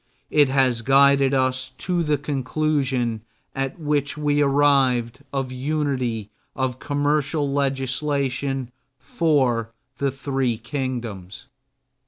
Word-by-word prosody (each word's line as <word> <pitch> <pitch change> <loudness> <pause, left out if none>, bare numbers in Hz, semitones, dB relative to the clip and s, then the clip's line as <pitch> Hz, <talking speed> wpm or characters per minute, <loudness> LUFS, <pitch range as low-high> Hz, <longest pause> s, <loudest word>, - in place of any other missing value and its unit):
It 145 -3 +4
has 130 -3 +2
guided 135 +1 +4
us 130 0 0
to 180 -1 -1
the 150 -2 +1
conclusion 135 -4 -1 0.3
at 135 0 -3
which 145 -2 -1
we 145 -1 +1
arrived 135 -4 +3
of 135 -2 -2
unity 130 -6 -2 0.2
of 130 -2 -2
commercial 145 +1 0
legislation 135 -1 -1 0.3
for 130 -5 +1 0.3
the 140 - +1
three 135 -3 -1
kingdoms. 120 -7 -5
135 Hz, 100 wpm, -23 LUFS, 130-145 Hz, 0.3 s, It